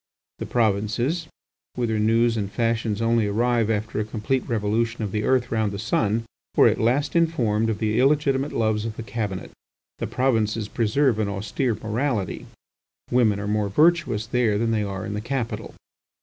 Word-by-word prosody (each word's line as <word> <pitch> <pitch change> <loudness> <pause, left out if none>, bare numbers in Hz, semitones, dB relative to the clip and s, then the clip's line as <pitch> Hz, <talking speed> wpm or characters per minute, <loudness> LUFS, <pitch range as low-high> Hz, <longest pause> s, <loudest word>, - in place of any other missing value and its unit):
The - - -4
provinces, 120 - 0 0.5
whither 115 -3 0
news 115 +2 +3
and 100 -3 -3
fashions 115 -1 0
only 115 -2 +2
arrive 115 +1 +1
after 110 0 -1
a - - +1
complete 110 +5 -1
revolution 115 +1 0
of 100 - -3
the 105 +1 -1
earth 125 -1 +1
round 110 -2 +1
the 100 - -5
sun, 110 +1 0 0.3
were - - +7
at - - +1
last 130 +8 +1
informed 120 -10 +2
of 110 - -1
the 110 +1 0
illegitimate 140 0 +2
loves 110 -2 0
of 110 -1 -4
the 115 - -5
Cabinet. 105 -5 -4 0.5
The - - -2
provinces 115 -4 0
preserve 120 +1 +1
an 105 - +1
austere 105 +5 -1
morality; 110 -3 -2 0.6
women 110 -5 +3
are 100 - -4
more 105 -1 0
virtuous 155 - +2
there 115 -2 +1
than 115 +1 0
they 110 -1 +1
are 95 -2 -4
in 105 - -4
the 105 - -3
capital. 120 0 -4
115 Hz, 170 wpm, -24 LUFS, 105-120 Hz, 0.6 s, were